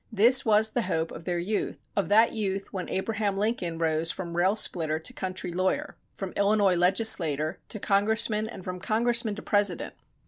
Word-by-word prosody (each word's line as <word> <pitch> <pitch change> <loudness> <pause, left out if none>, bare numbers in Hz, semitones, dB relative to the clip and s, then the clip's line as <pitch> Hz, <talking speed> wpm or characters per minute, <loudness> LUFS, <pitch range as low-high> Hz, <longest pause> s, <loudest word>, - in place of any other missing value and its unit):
This 235 +4 +4
was 220 0 +3
the 240 - 0
hope 165 -5 -2
of 165 - -10
their 175 -1 -1
youth, 200 +5 -2 0.2
of 200 - 0
that 220 +3 +5
youth 195 -3 -3
when 185 -2 -4
Abraham 205 +1 -1
Lincoln 195 -5 -1
rose 160 0 0
from 170 -1 -4
rail 185 +4 +2
splitter 160 -7 0
to 160 +11 -2
country 185 -4 -4
lawyer, 185 +2 -1 0.2
from 195 -2 -5
Illinois 200 -1 +3
legislator 170 -5 +2
to 215 - -4
congressman 215 +2 +2
and 190 - -9
from 180 0 -5
congressman 225 +2 0
to 215 - -9
President. 205 -4 +1
195 Hz, 175 wpm, -27 LUFS, 175-215 Hz, 0.2 s, that